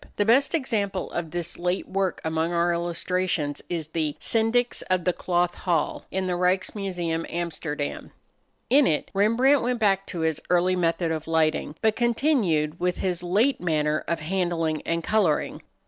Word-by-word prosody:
The 205 - +1
best 260 +9 +4
example 205 - -1
of 170 -2 -3
this 175 +1 -4
late 180 +2 -1
work 190 -1 -1
among 160 +1 0
our 170 0 +2
illustrations 170 -3 -1
is 170 -3 -2
the 155 -2 -2
"Syndics 235 +2 +1
of 185 -1 +2
the 180 - +1
Cloth 175 0 0
Hall," 170 -4 -1
in 190 0 -2
the 180 - -1
Ryks 180 +1 +1
Museum, 175 -5 -2
Amsterdam. 160 -4 -4 0.6
In 275 +2 +5
it 150 - -1
Rembrandt 230 +8 +4
went 245 +1 0
back 195 -3 +1
to 170 - -4
his 160 -1 0
early 180 +1 +3
method 170 -1 0
of 160 -1 -3
lighting, 155 -2 +1
but 220 -1 +3
continued 225 - +1
with 180 0 0
his 180 -2 -1
late 210 +10 +1
manner 155 -3 0
of 170 -1 -1
handling 165 -2 -1
and 165 0 0
coloring. 190 -8 +1
175 Hz, 165 wpm, -25 LUFS, 165-200 Hz, 0.6 s, In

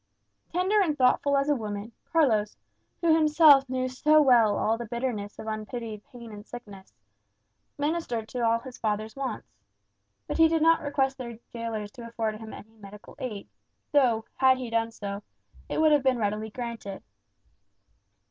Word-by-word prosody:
Tender 375 +4 +2
and 310 -6 0
thoughtful 275 +2 +3
as 275 +1 +1
a 295 - +3
woman, 210 -2 -5 0.2
Carlos, 225 -11 +2 0.4
who 335 -2 +4
himself 300 -3 +6
knew 255 0 -1
so 300 +4 +3
well 240 -7 +5
all 220 - +1
the 235 0 -6
bitterness 235 -3 -4
of - - -8
unpitied 215 0 -5
pain 235 -2 -11
and 205 -1 -9
sickness, 205 -5 -11 0.9
ministered 290 -7 -2
to 230 -2 +1
his 255 -2 -10
father's 215 0 -2
wants. 270 - -6 0.7
But - - -3
he 325 - +8
did 320 -1 +1
not 330 0 +5
request 270 -2 -1
their 235 -3 -7 0.2
gaolers 225 -3 -4
to 235 0 -10
afford 225 -2 -3
him 220 -1 -9
any 220 +2 -12
medical 210 +1 -13
aid, 215 -6 -5 0.4
though, 240 -6 +3
had 260 -1 +5
he 250 -3 -6
done 230 0 +1
so, 200 -2 -6 0.5
it - - -2
would 315 -1 +5
have 295 -1 +4
been 260 -1 +2
readily 215 0 -2
granted. 230 -4 -6
235 Hz, 160 wpm, -27 LUFS, 215-275 Hz, 0.9 s, he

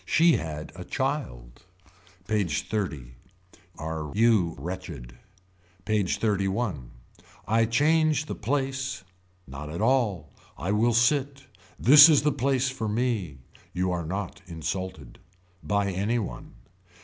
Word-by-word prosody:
She 165 +1 +4
had 80 -4 -6
a - - -7
child. - - -4 0.7
PAGE 100 -9 -1
XXX. 80 - -3 0.7
Are 80 -2 -5
you 105 -7 +3
wretched. 85 -9 -7 0.7
PAGE 105 -4 0
XXXI. 100 - -1 0.6
I 115 +1 +3
change 150 +5 +2
the - - -5
place. 135 0 -2 0.4
Not 70 +2 -8
at 85 +3 -5
all. 105 - +1 0.2
I 90 - -2
will 115 +3 +2
sit. 135 +2 +1 0.3
This 145 +5 +9
is 150 -3 +4
the 150 - +3
place 135 0 0
for 130 -4 -3
me. 105 - -1 0.4
You 90 +1 0
are 85 -3 -3
not 95 +2 -5
insulted. 90 +3 -5 0.4
By 100 -1 0
any 100 +6 0
one. 60 - -6
105 Hz, 120 wpm, -26 LUFS, 85-125 Hz, 0.7 s, This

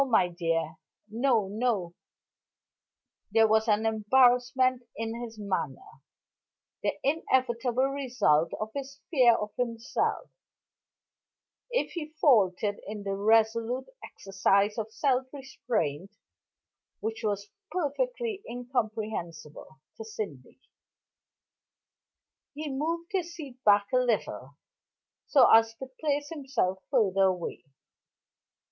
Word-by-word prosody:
"No, 275 - +2
my 220 -7 +3
dear 165 -2 -2 0.3
no, 230 -3 +2
no." 205 -4 -1 1.4
There 225 -1 +4
was 220 +1 +3
an 215 0 +2
embarrassment 250 +3 +3
in 225 0 -3
his 230 -2 -7
manner, 185 -9 -4 0.8
the - - -1
inevitable 255 -4 +1
result 245 - +1
of 215 - -3
his 275 0 -6
fear 250 -7 +6
of 210 -1 -4
himself 235 - -2 1.4
if - - -1
he 315 -2 -6
faltered 205 - +3
in 210 0 -6
the 195 0 -2
resolute 225 - +2
exercise 195 +1 +1
of 220 0 -4
self 255 +2 +1
restraint, 215 - -3 0.9
which 220 +1 -4
was 205 -1 -2 0.2
perfectly 430 - -2
incomprehensible 215 - -4 0.2
to - - -6
Sydney. 200 - -7 2.0
He 300 -1 -4
moved 330 +5 -3
his 345 -3 -2
seat 270 -6 -10
back 205 0 +5
a - - +5
little, 210 - -1 0.7
so 270 -5 +6
as 225 0 +5
to 265 - -7
place 290 -1 -1
himself 270 - -1
further 195 -7 +3
away. 180 -3 -2
225 Hz, 105 wpm, -28 LUFS, 200-265 Hz, 2.0 s, fear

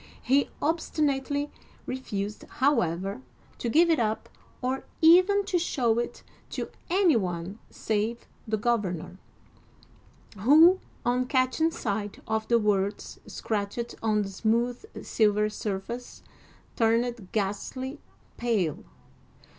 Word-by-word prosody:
He 275 +2 +3
obstinately 290 -2 0 0.3
refused, 210 -5 -4
however, 195 - +1 0.4
to 240 - -2
give 335 +7 +5
it 320 - +3
up 220 -1 -1 0.3
or 260 +1 -2 0.2
even 370 +5 +6
to 375 -3 +1
show 240 -9 +1
it 240 - -4 0.3
to - - -4 0.2
any 360 -4 +4
one 180 0 -2
save 220 +2 -2 0.2
the 215 0 0
governor, 195 -6 -1 1.2
who, 315 - +7 0.3
on 250 +1 +1
catching 260 +5 +2
sight 205 -9 -3
of 220 0 -1
the 235 - +4
words 205 -2 -1
scratched 215 +2 -3
on 215 -2 +2
the 195 - -5
smooth 235 - -1
silver 210 -1 +2
surface, 215 +4 -5 0.5
turned 230 -3 +1
ghastly 255 +7 -3 0.4
pale. 210 -11 0
235 Hz, 105 wpm, -27 LUFS, 205-275 Hz, 1.2 s, who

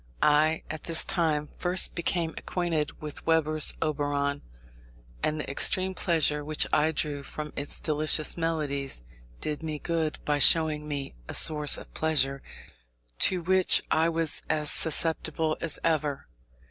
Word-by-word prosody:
I 155 +2 +2
at 155 0 -7
this 165 -1 +3
time 155 -4 -1
first 180 +1 +2
became 170 -1 -2
acquainted 170 -4 -3
with 150 -1 -8
Weber's 155 -2 +3
Oberon, 145 -2 -2 0.8
and 155 0 -2
the - - -5
extreme 185 +7 +3
pleasure 155 -5 0
which 155 +1 0
I 155 +1 +2
drew 145 -2 -3
from 150 +1 -8
its 145 0 -5
delicious 155 0 +3
melodies 145 - -3 0.4
did 150 0 -4
me 155 -2 -5
good 160 0 -3
by 145 -1 0
showing 155 0 +3
me 140 -2 -5 0.2
a - - +1
source 150 -2 +5
of - - -13
pleasure 140 -4 0 0.8
to 180 -2 +2
which 185 +1 +3
I 160 +1 +2
was 165 -1 -2
as 150 -1 +1
susceptible 160 0 0
as 165 -3 -1
ever. 150 -4 -1
155 Hz, 140 wpm, -27 LUFS, 150-165 Hz, 0.8 s, source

